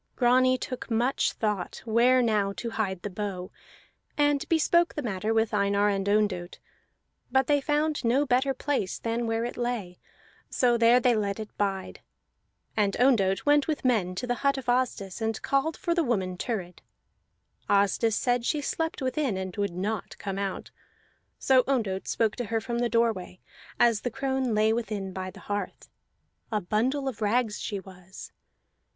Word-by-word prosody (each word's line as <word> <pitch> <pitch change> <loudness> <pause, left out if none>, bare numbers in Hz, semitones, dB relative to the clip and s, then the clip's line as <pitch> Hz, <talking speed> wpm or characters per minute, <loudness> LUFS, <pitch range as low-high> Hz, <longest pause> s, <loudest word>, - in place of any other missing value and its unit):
Grani 255 +1 +4
took 255 0 -6
much 240 +4 +1
thought 210 -5 -3
where 245 +3 +4
now 210 -4 +1
to 230 +3 -5
hide 190 -5 -2
the 205 - -3
bow, 185 -2 -5 0.7
and 290 +1 +2
bespoke 340 +1 +3
the 295 - -3
matter 215 -1 -2
with 225 0 +1
Einar 200 0 +2
and 200 0 -1
Ondott; 200 -4 0 0.7
but 265 +1 +3
they 290 0 +2
found 300 0 0
no 255 +5 +2
better 260 +1 +2
place 260 -9 -1
than 230 +1 -2
where 225 +1 0
it 240 - -5
lay, 235 -7 -3 0.5
so 245 -3 +2
there 235 +1 +5
they 245 -1 +3
let 200 -1 -1
it 215 -1 -8
bide. 195 -2 -2 0.7
And 205 -2 +1
Ondott 210 -7 +3
went 290 -1 +4
with 305 -4 -2
men 200 -8 +1
to 250 - -3
the 245 - 0
hut 275 0 +2
of 265 - -6
Asdis, 240 -6 -1
and 225 0 -1
called 275 +3 0
for 345 -3 -1
the 340 -1 +2
woman 190 -8 -1
Thurid. 180 -4 -4 0.9
Asdis 205 +2 +3
said 245 -1 +1
she 300 +5 0
slept 320 0 -2
within, 260 -5 0
and 190 -1 -5
would 200 -4 -2
not 210 +4 -3
come 195 -1 -4
out. 195 -1 -4 0.7
So 260 -1 +4
Ondott 215 -8 -1
spoke 225 -2 +1
to 245 - -2
her 225 +1 -1
from 235 0 -3
the 240 0 +1
doorway, 225 -6 0 0.4
as 230 -3 +4
the 245 - -2
crone 265 -2 -1
lay 215 +1 +3
within 210 -5 -3
by 185 0 -4
the - - -13
hearth; 205 -2 -5 0.6
a 215 - +1
bundle 250 +9 0
of 235 -4 -5
rags 215 0 +1
she 205 - -3
was. 190 -1 -12
225 Hz, 170 wpm, -27 LUFS, 200-255 Hz, 0.9 s, there